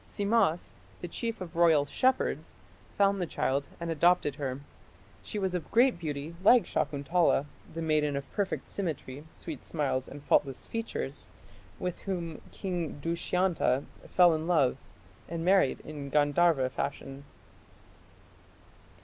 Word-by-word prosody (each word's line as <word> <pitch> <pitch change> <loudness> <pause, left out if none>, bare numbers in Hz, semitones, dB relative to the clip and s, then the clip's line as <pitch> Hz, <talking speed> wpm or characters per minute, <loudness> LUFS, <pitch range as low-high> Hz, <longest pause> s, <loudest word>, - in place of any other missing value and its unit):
Simmas, 200 -5 +1 0.3
the 175 - -4
chief 225 +4 -4
of 175 -2 -7
royal 165 -4 +5
shepherds, 260 - 0 0.4
found 200 -1 +3
the 175 - -1
child 140 -1 -1
and 170 -1 -3
adopted 165 -3 +3
her. 135 -2 -3 0.6
She 215 - -6
was 190 -2 -1
of 175 -4 -3
great 245 -3 +4
beauty 150 -1 -4
like 240 +3 +7
Shakuntala, 145 +1 +1 0.3
the 165 0 -4
maiden 150 -2 +1
of 140 0 -4
"perfect 200 -2 -2
symmetry", 150 -6 -4
"sweet - - -7
smiles", 140 -5 -1
and 145 +1 -10
"faultless 135 -2 +1
features", 225 - -5 0.5
with 180 -1 -4
whom 170 -5 -4
King 175 -6 -4
Dushyanta 170 -3 +1 0.3
fell 175 -2 +6
in 160 +1 -2
love 155 -8 +3 0.5
and 165 0 -3
married 190 -7 +3
in 145 -2 -7
Gandharva 145 -1 +3
fashion. 135 0 -4
165 Hz, 130 wpm, -30 LUFS, 145-180 Hz, 0.6 s, like